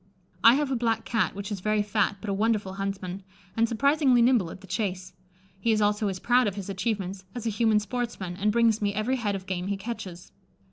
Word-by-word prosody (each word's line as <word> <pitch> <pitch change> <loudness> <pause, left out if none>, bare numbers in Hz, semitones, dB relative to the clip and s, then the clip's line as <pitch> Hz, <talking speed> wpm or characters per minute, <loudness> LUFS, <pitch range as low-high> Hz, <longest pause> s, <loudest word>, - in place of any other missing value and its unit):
I 230 +2 +8
have 290 -1 0
a - - +1
black 230 -2 0
Cat, 215 -6 0
which 200 +1 -6
is 200 - -3
very 215 +2 +1
fat, 205 -1 0
but 215 - -5
a - - 0
wonderful 210 -2 0
huntsman, 195 -1 -4 0.3
and 230 0 +2
surprisingly 270 0 +3
nimble 235 -8 +3
at 185 - -10
the - - -12
chase. 185 -2 -3 0.5
He 230 +4 +1
is 215 - +2
also 210 0 +1
as 190 -2 -2
proud 245 +5 +3
of 200 - -2
his 200 -1 -5
achievements 195 -2 -3
as 240 - -5
a 225 - +1
human 215 0 +3
sportsman, 210 -4 -4
and 210 +3 +1
brings 225 -1 +3
me 205 0 0
every 235 +5 0
head 210 -5 -1
of 190 -1 -6
game 185 -1 -3
he 200 0 -1
catches. 195 -5 -7
210 Hz, 225 wpm, -27 LUFS, 195-230 Hz, 0.5 s, I